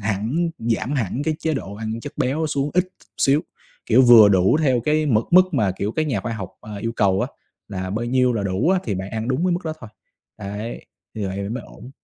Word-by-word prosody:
hẳn, 110 - -1
giảm 115 +3 -1
hẳn 125 0 -1
cái 155 +1 0
chế 160 -2 -1
độ 100 -7 -5
ăn 110 +2 -5
chất 145 - -8
béo 150 +5 0
xuống 145 -1 -1
ít 180 +1 +3
t 185 - -26 0.2
xíu, 140 +2 +3 0.5
kiểu, 125 +4 +5
vừa 115 -4 +9
đủ 95 +7 +4
theo 130 -6 +2
cái 155 +4 +1
mực 115 -4 +2
mức 185 0 +5
mà, 105 -8 +2
kiểu, 105 +3 -2
các 155 -1 -1
nhà 115 -9 -1
khoa 120 - -4
học, 95 -5 -6
à, 105 -1 -9
yêu 115 +3 -3
cầu 95 -4 +2
á - - -1 0.4
là 95 -2 -4
bao 110 +4 -2
nhiêu 125 +1 +2
là 110 -4 -1
đủ 100 - 0
á 190 - +3
thì 105 - -2
bạn 95 +1 -5
ăn 110 +2 -3
đúng 135 +7 0
cái 185 - +2
mức 175 - -1
đó 160 - -2
thôi, 115 - -10 0.5
đấy, 105 +3 -6 0.3
như 105 -2 -3
vậy 95 - -5
thì 100 0 -3
mới 120 +3 -4
ổn. 125 - -13
115 Hz, 250 wpm, -22 LUFS, 105-145 Hz, 0.5 s, vừa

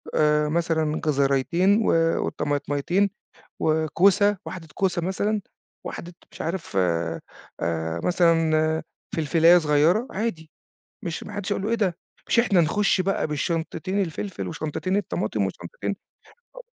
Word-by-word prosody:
آآ 150 0 +3
مثلًا 160 -2 0
جزريتين 155 +8 +2
و - - +3 0.4
وطماطميتين 145 +7 0 0.5
وكوسة، 180 +6 +3
واحدة 165 -4 -7
كوسة 185 -3 0
مثلًا، 205 +4 0 0.5
واحدة 175 +1 -7 0.2
مش - - -14
عارف 165 - -4
آآ 85 -2 0 0.8
مثلًا 160 -2 +2 0.3
فلفلاية 165 +2 +5
صغيرة 160 - +3
عادي، 190 -7 -3 0.5
مش 170 -2 -4
ما 210 - -9
حدّش 205 0 -3
هيقول 195 - -2
له 215 - -1
إيه - - +3
ده؟ 185 -6 0 0.3
مش 235 - +4
إحنا 200 -7 +3
نخُش 195 +4 +2
بقى 195 -2 0
بالشنطتين 165 +4 -2
الفلفل 190 +3 -4
وشنطتين 165 +4 -2
الطماطم 205 - -1
وشنطتين - - -5 0.6
أ - - -8
170 Hz, 120 wpm, -24 LUFS, 155-195 Hz, 0.8 s, فلفلاية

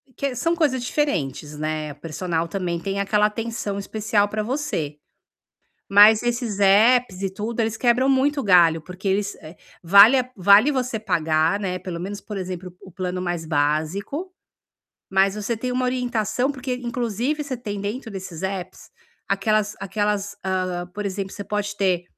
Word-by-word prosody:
Que 275 -2 -2
são 330 +8 0
coisas 280 -7 +1
diferentes, 150 - -2
né, 155 0 -3
o - - -11
personal 165 +2 -3
também 175 -1 -3
tem 195 +3 -3
aquela 210 +1 +2
atenção 220 -2 -4
especial 205 0 0
pra 215 +1 -3
você. 215 - -3 0.9
Mas 210 +2 +7
esses 240 -3 -2
apps 205 +1 +4
e 195 - 0
tudo, 220 +4 -4
eles 220 -1 0
quebram 250 +2 +2
muito 275 +2 +2
o - - -3
galho, 170 -4 +5
porque 185 +4 -6
eles, 200 +1 0
eh, 160 +2 -11 0.3
vale 200 +9 +8
a 255 0 -2
vale 200 +7 +6
você 250 -4 -1
pagar, 165 -3 +1
né, 185 -2 -2
pelo 180 -1 -6
menos, 200 +3 -5
por 210 - -8
exemplo, 185 -1 -6
o 190 - -13
plano 180 0 -3
mais 175 -2 -3
básico, 160 - -1 0.8
mas 195 0 +3
você 210 +2 -2
tem 250 +3 -3
uma 255 0 0
orientação, 250 0 0
porque 260 -1 -4
inclusive 245 +3 -2
você 270 -3 -4
tem 205 -4 -5
dentro 225 +4 -4
desses 190 -4 -7
apps 190 -1 -5 0.4
aquelas 210 +1 +1
aquelas, 205 +1 -2
hã, 185 -2 -2
por 210 - -4
exemplo, 195 0 -4
você 205 - -6
pode 205 +1 -3
ter 185 -3 +1
200 Hz, 165 wpm, -23 LUFS, 180-235 Hz, 0.9 s, vale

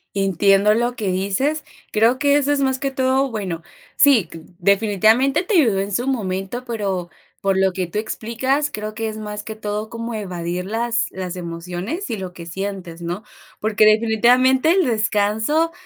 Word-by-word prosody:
Entiendo 195 +2 +3
lo 240 +2 0
que 215 -5 -3
dices, 200 +12 0 0.3
creo 230 +4 +3
que 285 0 +4
eso 290 0 +1
es 290 - +2
más 265 -1 +1
que 275 +1 -2
todo, 265 0 +1
bueno, 185 -7 -4 0.3
sí, 255 - +5 0.3
definitivamente 215 - +3
te 385 +3 -1
ayudó 225 -10 +3
en 200 +1 -2
su 240 +6 -1
momento, 205 -1 -2
pero 195 -7 -3 0.3
por 195 -1 +1
lo 190 -1 +2
que 185 -1 -2
tú 175 - -5
explicas, 245 +6 -1
creo 215 0 -5
que 225 0 -3
es 215 - -7
más 210 -1 -6
que 220 - -7
todo 215 0 -4
como 230 0 -5
evadir 180 -4 -4
las 230 +3 -1
las 185 -1 -5
emociones 180 - -5
y 225 - -2
lo 190 -2 -6
que 175 -2 -10
sientes, 185 -1 -6
¿no? 175 +5 -4 0.4
Porque, 215 0 +3
definitivamente, 240 +6 +4
el 370 0 +3
descanso 220 +7 +1
215 Hz, 170 wpm, -21 LUFS, 195-250 Hz, 0.4 s, sí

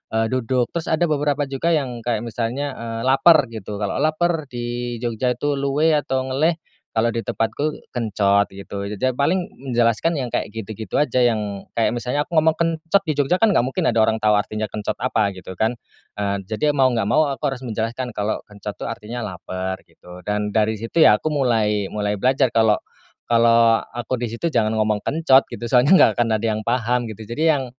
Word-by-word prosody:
eee, 110 +1 +1
duduk. 125 -1 0
Terus 170 -1 -4
ada 160 +2 +1
beberapa 145 0 +1
juga 140 +5 0
yang 130 -5 -2
kayak 115 -1 -2
misalnya, 120 +5 -3
eee, 115 -1 -5
"lapar," 135 0 +5
gitu. 105 -2 -7
Kalau 100 0 -2
laper 155 -1 0
di 120 -1 -4
Jogja 120 +1 -1
itu 145 +2 -1
luwe 145 +4 +2
atau 135 -3 0
ngeleh, 145 +6 +1 0.4
kalau 115 +1 +1
di 115 0 -2
tempatku 145 +8 -2
kencot, 100 -3 +1
gitu. 100 +1 -7
Jadi, 100 0 -5
ya, 130 -1 0
paling 175 +7 +1 0.2
menjelaskan 120 +7 +2
yang 125 - -2
kayak 115 - -3
gitu-gitu 110 -1 -4
aja, 130 -4 +2
yang 105 -4 0
kayak 115 +1 0
misalnya 125 +5 -2
aku 170 - -6
ngomong 160 +1 +5
kencot 165 +3 +1
di 155 - 0
Jogja, 145 +6 +1
kan, 225 - +5
nggak - - +4
mungkin 130 +1 -1
ada 115 - +1
orang 110 0 +1
tau 105 -1 +3
artinya 110 +1 -1
kencot 105 +1 -4
apa, 110 -5 +1
gitu, 95 0 -10
kan. 110 +6 +1 0.5
Eee, 100 -1 -1
jadi 145 +9 -1
mau 130 -2 +4
nggak 115 -4 0
mau 145 +3 +3
aku 135 - -2
harus 135 -1 -4
menjelaskan 120 +2 -3
kalau 105 0 -2
kencot, 105 0 -8
tuh, - - -5
artinya 115 +2 -6
lapar, 95 0 -5
gitu. 90 0 -14
Dan 105 0 -1
dari 110 +1 +1
situ, 115 +9 -3
ya, - - +7
aku 155 +8 -3
mulai 110 -7 +1
mulai 105 -1 -2
belajar 130 +1 +2
kalau 110 -2 +4 0.5
kalau 115 -1 +4 0.2
aku 120 +1 -3
di 120 - -2
situ 115 +9 -3
jangan 110 -4 +1
ngomong 110 -1 +1
kencot, 135 +1 +3
gitu, - - -8
soalnya 135 +9 +6
nggak - - +6
akan 120 - +3
ada 110 - -4
yang 110 - -2
paham, 120 0 0
gitu. 110 0 -8
Jadi 120 +8 -4
yang 135 - -2
120 Hz, 200 wpm, -21 LUFS, 110-135 Hz, 0.5 s, ya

